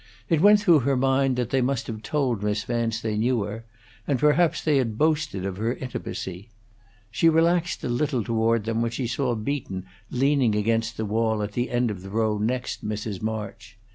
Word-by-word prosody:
It 160 Hz, -2 st, +3 dB
went 205 Hz, +2 st, +7 dB
through 175 Hz, -6 st, +5 dB
her 135 Hz, +1 st, +1 dB
mind 135 Hz, 0 st, +2 dB
that 125 Hz, -1 st, -2 dB
they 135 Hz, -, +2 dB
must 125 Hz, 0 st, 0 dB
have 110 Hz, -2 st, -6 dB
told 130 Hz, -6 st, -1 dB
Miss 105 Hz, +1 st, -1 dB
Vance 115 Hz, -1 st, -1 dB
they 110 Hz, -2 st, -2 dB
knew 120 Hz, -1 st, +1 dB
her; 110 Hz, +3 st, -6 dB, 0.4 s
and 140 Hz, -, +2 dB
perhaps 150 Hz, +4 st, +3 dB
they 150 Hz, -3 st, +3 dB
had 115 Hz, -5 st, -1 dB
boasted 150 Hz, -, 0 dB
of 95 Hz, -1 st, -4 dB
her 115 Hz, +4 st, -1 dB
intimacy. 100 Hz, -5 st, -6 dB, 0.6 s
She 165 Hz, +9 st, +4 dB
relaxed 170 Hz, +2 st, +2 dB
a -, -, -1 dB
little 125 Hz, 0 st, 0 dB
toward 115 Hz, -1 st, +1 dB
them 115 Hz, +1 st, -1 dB
when 115 Hz, -, +1 dB
she 120 Hz, +2 st, -3 dB
saw 120 Hz, +1 st, -1 dB
Beaton 110 Hz, -5 st, -4 dB, 0.2 s
leaning 130 Hz, -3 st, +2 dB
against 115 Hz, +2 st, 0 dB
the 110 Hz, -, -2 dB
wall 110 Hz, 0 st, 0 dB
at 105 Hz, -, -4 dB
the 120 Hz, +3 st, -2 dB
end 120 Hz, -2 st, +1 dB
of 95 Hz, -3 st, -7 dB
the 95 Hz, -, -9 dB
row 110 Hz, 0 st, 0 dB
next 125 Hz, +4 st, -2 dB
Mrs. 105 Hz, -2 st, -4 dB
March. 110 Hz, 0 st, -5 dB
115 Hz, 200 wpm, -25 LUFS, 110-135 Hz, 0.6 s, went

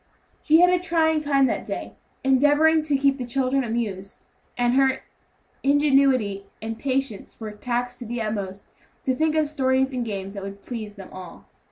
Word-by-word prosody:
She 320 Hz, +2 st, +5 dB
had 360 Hz, 0 st, +6 dB
a 360 Hz, -, +3 dB
trying 325 Hz, -3 st, +2 dB
time 280 Hz, -2 st, +3 dB
that -, -, -1 dB
day, -, -, -5 dB, 0.3 s
endeavoring 290 Hz, +4 st, +4 dB
to 290 Hz, -2 st, +2 dB
keep 275 Hz, 0 st, +2 dB
the -, -, -2 dB
children 265 Hz, +2 st, +1 dB
amused; 215 Hz, -5 st, -4 dB, 0.3 s
and 245 Hz, 0 st, +2 dB
her 265 Hz, 0 st, +2 dB, 0.6 s
ingenuity 270 Hz, -8 st, +2 dB
and 225 Hz, +1 st, -5 dB
patience 265 Hz, -5 st, -3 dB
were 220 Hz, -2 st, -6 dB
taxed 245 Hz, +3 st, -3 dB
to 245 Hz, -, -7 dB
the 240 Hz, +1 st, -3 dB
utmost 200 Hz, -3 st, -4 dB, 0.4 s
to 260 Hz, -, +1 dB
think 310 Hz, +4 st, +1 dB
of 310 Hz, -1 st, +3 dB
stories 265 Hz, -2 st, +1 dB
and 250 Hz, -1 st, -1 dB
games 195 Hz, -3 st, -5 dB
that 200 Hz, -, -6 dB
would 200 Hz, +1 st, -8 dB
please 215 Hz, -4 st, -6 dB
them 195 Hz, -2 st, -11 dB
all. 185 Hz, -2 st, -10 dB
255 Hz, 175 wpm, -24 LUFS, 215-280 Hz, 0.6 s, had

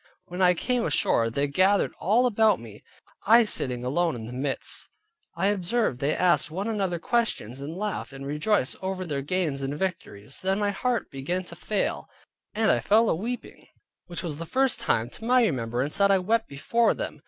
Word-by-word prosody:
When 180 Hz, +2 st, -5 dB
I 180 Hz, -1 st, +5 dB
came 245 Hz, +6 st, 0 dB
ashore, 115 Hz, -6 st, +2 dB
they 140 Hz, +5 st, 0 dB
gathered 190 Hz, +7 st, +2 dB
all 230 Hz, +6 st, +3 dB
about 220 Hz, -3 st, +3 dB
me, 110 Hz, -3 st, -12 dB, 0.4 s
I 230 Hz, +2 st, +7 dB
sitting 125 Hz, -, -1 dB
alone 165 Hz, +4 st, +1 dB
in 110 Hz, -2 st, -7 dB
the 120 Hz, -, -8 dB
midst. 135 Hz, +2 st, 0 dB, 0.5 s
I 190 Hz, +4 st, +1 dB
observed 205 Hz, -, 0 dB
they 140 Hz, +3 st, 0 dB
asked 180 Hz, -2 st, +2 dB
one 190 Hz, +6 st, -4 dB
another 195 Hz, -6 st, -1 dB
questions, 165 Hz, -, -1 dB
and 155 Hz, +5 st, -6 dB
laughed, 210 Hz, -5 st, -3 dB
and 135 Hz, 0 st, -8 dB
rejoiced 150 Hz, +2 st, 0 dB
over 190 Hz, -1 st, -3 dB
their 145 Hz, -4 st, -3 dB
gains 150 Hz, -2 st, -1 dB
and 135 Hz, +2 st, -3 dB
victories. 150 Hz, -, -5 dB
Then 190 Hz, +1 st, 0 dB
my 205 Hz, -1 st, +1 dB
heart 245 Hz, +4 st, -2 dB
began 170 Hz, +8 st, -3 dB
to 170 Hz, -, -10 dB
fail: 205 Hz, +4 st, -2 dB, 0.5 s
and 220 Hz, 0 st, +3 dB
I -, -, +2 dB
fell 220 Hz, +2 st, +3 dB
aweeping, 230 Hz, +9 st, -5 dB, 0.4 s
which 175 Hz, 0 st, -6 dB
was 155 Hz, -4 st, -4 dB
the 165 Hz, -, -6 dB
first 265 Hz, +5 st, +1 dB
time 115 Hz, +1 st, 0 dB
to -, -, -9 dB
my 250 Hz, +1 st, +4 dB
remembrance, 125 Hz, -, -1 dB
that 200 Hz, 0 st, +4 dB
I 195 Hz, -, +5 dB
wept 220 Hz, +5 st, 0 dB
before 230 Hz, +12 st, +1 dB
them. -, -, -5 dB
180 Hz, 190 wpm, -26 LUFS, 140-210 Hz, 0.5 s, I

